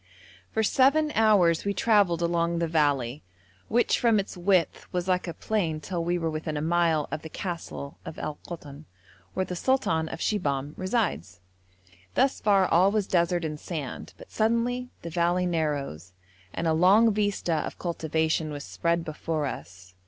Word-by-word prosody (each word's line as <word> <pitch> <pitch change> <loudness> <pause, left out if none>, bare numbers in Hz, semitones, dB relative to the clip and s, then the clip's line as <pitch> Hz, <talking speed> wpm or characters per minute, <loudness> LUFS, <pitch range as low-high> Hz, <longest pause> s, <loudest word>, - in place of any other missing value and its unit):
For 220 - 0
seven 280 +7 +3
hours 200 -7 +4
we 200 0 -1
travelled 200 -7 +3
along 170 0 +1
the 170 0 0
valley, 145 -5 +1 0.5
which 240 +2 +2
from 230 -3 +4
its 200 - -4
width 180 -1 +1
was 180 0 -2
like 180 0 +1
a 170 - -3
plain 175 -8 -1
till 170 +1 -3
we 175 +1 0
were 165 -1 -2
within 155 0 -3
a - - -1
mile 165 -2 +2
of 155 - -3
the 160 - -8
castle 170 -5 -6
of - - -8
Al 150 -1 -5
Koton, 150 -3 -9 0.5
where 185 - 0
the 180 - -5
sultan 170 -8 +1
of - - -5
Shibahm 145 -9 -1
resides. 185 - -2 0.8
Thus 265 +1 +2
far 195 -3 +4
all 180 +4 +4
was 210 -1 0
desert 175 -1 +1
and 150 -1 -4
sand, 150 -7 -6
but - - -14
suddenly 235 +3 0
the 170 - -6
valley 175 +2 +1
narrows, 145 - -2 0.4
and 165 - -3
a 160 - +3
long 200 +7 +5
vista 205 -4 0
of 150 - -4
cultivation 160 -2 -1
was 145 -1 -6
spread 170 0 -1
before 155 0 -3
us. 90 -8 -8
170 Hz, 165 wpm, -27 LUFS, 155-200 Hz, 0.8 s, long